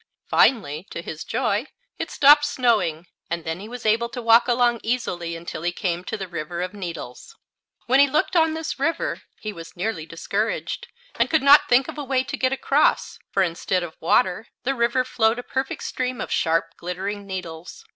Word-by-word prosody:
Finally, 175 - +3
to - - -6
his 160 -2 -6
joy, 240 0 -1 0.3
it - - -3
stopped 295 +1 +6
snowing, 220 - +1 0.2
and 170 0 -3
then 160 +2 -3
he 210 +3 -9
was 245 -1 -8
able 230 +2 +2
to 245 - -6
walk 230 0 +5
along 240 -1 +2
easily 175 -8 -2
until 165 -1 -7
he 175 +1 0
came 175 -1 -2
to - - -4
the 190 -2 -5
River 170 0 -4
of 185 - -5
Needles. 170 - -7 0.5
When 260 +3 +4
he 280 0 +6
looked 305 +6 0
on 320 -2 +3
this 320 -3 -4
river 330 +4 -1 0.2
he 215 -1 -5
was 165 -2 -11
nearly 180 -4 -3
discouraged, 200 +7 -3 0.3
and - - +3
could 315 -3 +2
not 285 +1 +7
think 250 +2 +4
of - - -7
a - - -3
way 260 -1 +1
to 285 +2 -4
get 260 -2 +1
across; 275 +2 +1
for 195 - +2
instead 180 +1 -1
of 165 -2 -6
water 185 +4 +2 0.2
the 270 +2 +1
river 240 +1 +1
flowed 225 -2 +1
a 245 - -5
perfect 265 +1 -3
stream 255 -2 -3
of - - -5
sharp, 165 0 +1
glittering 195 +3 -5
needles. 180 - -7
220 Hz, 195 wpm, -23 LUFS, 175-260 Hz, 0.5 s, not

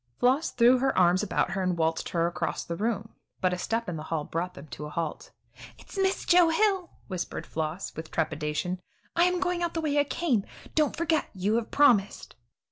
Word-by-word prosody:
Floss 265 +6 +3
threw 245 +2 +5
her 270 +1 +1
arms 180 0 +5
about 210 -3 0
her 190 +1 -1
and 180 -2 0
waltzed 160 0 0
her 170 -1 +1
across 170 - -2
the 170 - -4
room, 220 +2 -2 0.3
but 185 -1 +1
a - - -1
step 230 +4 -1
in 175 -3 -3
the 155 - -7
hall 160 -2 -1
brought 170 +4 -3
them 140 - -10
to 150 - -6
a - - -8
halt. 165 0 -4 0.5
"It's - - -14
Miss 385 -1 0
Joe 350 -2 +6
Hill," 380 +1 +2 0.2
whispered 185 -3 -4
Floss, 160 +4 -4
with 160 0 -7
trepidation; 160 +3 -2 0.3
"I 340 +1 +5
am 360 0 +1
going 360 -1 0
out 340 -1 -1
the - - +1
way 295 -2 +1
I - - +5
came. 275 - 0 0.3
Don't 305 -2 +2
you - - -19
forget; 325 -2 +1
you 195 +3 0
have 235 - -2
promised." 240 -9 +3
205 Hz, 210 wpm, -28 LUFS, -, 0.5 s, Joe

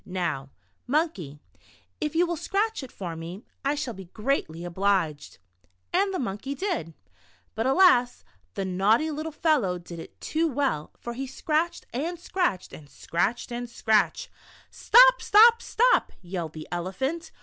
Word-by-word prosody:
Now, 165 -7 -3 0.4
Monkey, 250 - -1 0.6
if 300 0 -3
you 345 +2 +4
will 345 0 -2
scratch 415 +6 -1
it 265 - -9
for 175 -4 -6
me, 170 +6 -8 0.2
I 280 +2 +1
shall 285 -5 -3
be 190 -2 -10
greatly 180 - -2
obliged." 175 -4 -1 0.6
And 390 +2 +2
the 375 - -2
Monkey 250 - -4
did. 315 - -3 0.6
But 225 +4 -1
alas, 265 -6 +4 0.3
the 195 -2 -2
naughty 205 +11 +2
little 310 +2 -4
fel 310 0 +2
low 180 -6 -2
did 170 -1 -10
it - - -12
too 325 +1 0
well, 270 - -1
for 235 - -6
he 265 +3 -5
scratched 310 +5 -1
and 325 +8 -2
scratched 350 - -2
and 145 -2 -12
scratched 200 - -2
and 240 0 -4
scratched. 220 - +1 0.4
"Stop, - - +6
stop, 465 +3 +6
stop," - - +2
yelled 175 -3 -5
the 155 -1 -8
Elephant. 265 - -3
245 Hz, 150 wpm, -26 LUFS, -, 0.6 s, Stop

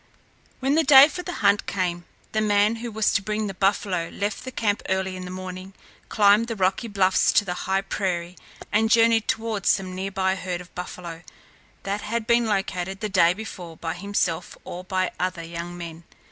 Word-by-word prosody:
When 270 +2 +2
the 320 +2 +4
day 280 -2 +9
for 320 +4 -6
the 355 - -5
hunt 200 +1 +3
came, 175 -3 -2 0.3
the 215 - 0
man 210 +1 +3
who 235 +1 -6
was 220 0 +1
to - - +2
bring 215 +1 -2
the 195 - -4
buffalo 190 -2 0
left 205 +3 -3
the 260 - -5
camp 215 -4 0
early 190 0 -1
in 185 0 -7
the - - -7
morning, 185 +1 -7 0.3
climbed 210 +2 +4
the 230 - -3
rocky 195 +4 0
bluffs 190 -3 +3
to 205 - +4
the 180 - -2 0.2
high 190 0 +2
prairie, 180 -3 -3 0.4
and 220 +1 +2
journeyed 230 -1 +4
toward 220 -3 -1
some 185 -2 +2
near 190 +1 -3
by 190 -1 0
herd 185 -2 -4
of 180 0 -13
buffalo, 175 -2 -7 0.6
that 200 +1 -2
had 225 +1 -2
been 235 0 +3
located 195 -2 -2
the 215 - -3
day 175 -2 +4
before 180 -6 -8
by 165 -1 -3
himself 195 -4 -2
or 180 +1 -7
by 185 0 -1
other 180 -2 -2
young 170 +1 -6
men. 170 -1 -8
195 Hz, 195 wpm, -24 LUFS, 180-215 Hz, 0.6 s, day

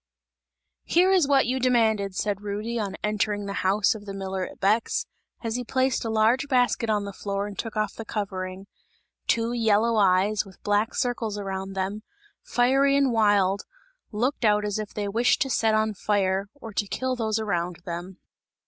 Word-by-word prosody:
"Here 365 +3 +4
is 365 -7 +4
what 275 -2 +4
you 255 +3 0
demanded!" 220 -6 +2
said 205 0 -1
Rudy, 210 +3 -3
on 200 -3 -3
entering 210 -1 0
the 200 - -4
house 200 +4 +3
of 210 -2 -10
the 195 - -5
miller 190 -1 -3
at - - -13
Bex, 215 +4 +1 0.4
as 230 +1 -1
he 250 - -3
placed 260 +1 0
a 230 - -3
large 225 +5 +2
basket 245 -3 +2
on 210 -2 +1
the 200 - -6
floor 200 0 -3
and 205 -1 -7
took 225 0 -5
off 215 0 0
the 225 - -7
covering. 190 -3 -4 0.6
Two 230 +1 +1
yellow 225 0 +2
eyes, 200 +1 +3
with 195 -3 -15
black 205 +3 +1
circles 235 -4 -1
around 195 -1 -4
them, 195 +2 -3 0.4
fiery 270 +3 +3
and 275 -2 +3
wild, 205 -3 +3 0.5
looked 245 +6 -1
out 210 -1 +3
as 210 0 -2
if 210 -1 -5
they 205 -1 -3
wished 230 +5 +2
to 270 - -5
set 220 -2 +2
on 215 0 +1
fire, 195 -1 0
or 225 -6 -10
to 205 - -1
kill 260 +5 -2
those 220 -3 -1
around 180 -5 -1
them. 175 +2 -6
210 Hz, 185 wpm, -25 LUFS, 200-235 Hz, 0.6 s, Here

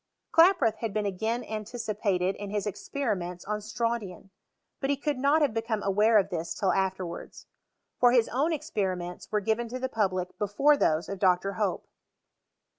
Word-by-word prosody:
Klaproth 330 - +5
had 225 -3 -4
been 210 -1 0
again 220 +5 -1
anticipated 215 -4 -2
in 205 -1 -6
his 205 0 -2
expe* 275 +7 -4
riments 180 -5 -2
on 210 0 -1
strontian; 215 -3 -3 0.5
but 270 - -2
he 285 - +2
could 285 -1 -2
not 290 +3 +3
have 275 -7 +1
become 225 -1 -2
aware 210 +3 +4
of 195 -1 +2
this 170 -1 -3
till 195 - +1
afterwards. 190 -2 -3 0.5
For 245 -1 +6
his 240 -2 +4
own 275 +7 +1
experi 220 - -1
ments 175 0 -8
were 210 -1 +1
given 225 +3 0
to 250 - -4
the 260 0 -3
public 185 -6 -1
before 210 +9 +3
those 160 - +1
of 195 - -5
Dr. 185 +1 +2
Hope. 205 -4 -1
215 Hz, 175 wpm, -28 LUFS, 190-240 Hz, 0.5 s, For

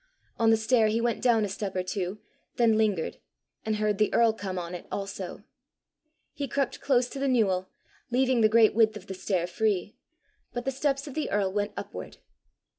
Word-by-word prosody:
On 225 -1 +4
the 225 - +5
stair 220 0 +3
he 220 +2 +1
went 235 0 0
down 230 -4 +3
a - - -2
step 200 0 -4
or 185 - 0
two, 185 +1 -3 0.4
then 230 -2 +4
lingered, 210 -6 0 0.4
and 220 0 -1
heard 210 -1 0
the 215 - +3
earl 230 -1 +5
come 195 -4 -5
on 175 0 -4
it 180 - -7
also. 195 -2 -5 0.9
He 285 -2 -3
crept 275 +1 -2
close 255 -3 +2
to 275 - -7
the 275 - 0
newel, 195 -7 +2 0.4
leaving 255 0 +2
the 215 - +5
great 220 -1 +5
width 220 -1 +3
of 195 - -12
the 195 - -6
stair 185 -2 -1
free, 205 +1 -1 0.6
but 245 0 -4
the 270 - 0
steps 275 +1 -1
of 285 - -8
the 310 - -2
earl 195 -2 0
went 205 0 -1
upward. - - -7
220 Hz, 195 wpm, -28 LUFS, 195-240 Hz, 0.9 s, the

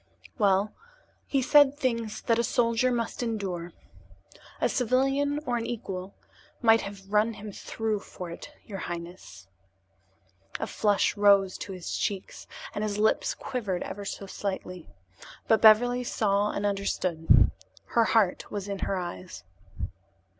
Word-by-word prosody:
"Well, 200 0 +3 0.5
he 275 -2 +1
said 290 +1 +6
things 230 -6 -2
that 230 -1 +2
a - - +3
soldier 235 +2 +2
must 235 0 -2
endure. 195 -7 -3 0.9
A - - +3
civilian 270 +3 +1
or 245 -2 0
an 230 - -3
equal 195 -5 -5 0.4
might 225 -2 +5
have 195 0 -9
run 215 +2 +3
him 210 0 -8
through 220 +1 -3
for 180 -3 -8
it, 170 - -9 0.2
your 195 -3 -6
highness." 170 - -8 1.1
A - - -1
flush 205 -2 +1
rose 200 -2 +4
to 200 - -6
his 180 -2 -5
cheeks 195 -3 -3 0.3
and 210 - -2
his 210 -1 -2
lips 215 +1 +2
quivered 210 -9 -3
ever 205 - -6
so 200 0 -5
slightly. 190 -3 -5 0.6
But 225 - +4
Beverly 245 +3 +6
saw 205 -3 +1
and 205 - -2
understood. 190 -5 +2 0.4
Her 230 -1 +3
heart 215 -5 +2
was 205 -1 -4
in 200 -1 -4
her 195 - -1
eyes. 180 0 -6
210 Hz, 140 wpm, -28 LUFS, 195-230 Hz, 1.1 s, said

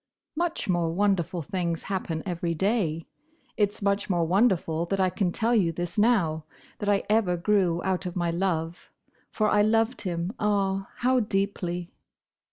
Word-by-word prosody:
"Much 340 +1 -1
more 175 -3 +1
wonderful 180 -2 0
things 170 0 -2
happen 180 -5 -3
every 170 -2 -2
day. 170 -4 0 0.5
It's 205 -1 0
much 200 +1 0
more 175 -3 +2
wonderful 175 -4 +2
that 195 +2 -1
I 185 -1 +2
can 180 -2 0
tell 230 +6 +1
you 190 -8 +3
this 175 +1 -5
now: 185 -9 +2 0.4
that 205 - -1
I 200 -1 +2
ever 210 -5 +2
grew 175 -2 +1
out 185 -1 -1
of 175 - -6
my 175 -2 0
love. 170 -1 -2 0.4
For 215 - 0
I 210 0 +4
loved 225 +3 +2
him—ah, 195 +2 -1
how 255 +1 +2
deeply!" 195 -5 -2
190 Hz, 155 wpm, -26 LUFS, 170-205 Hz, 0.5 s, I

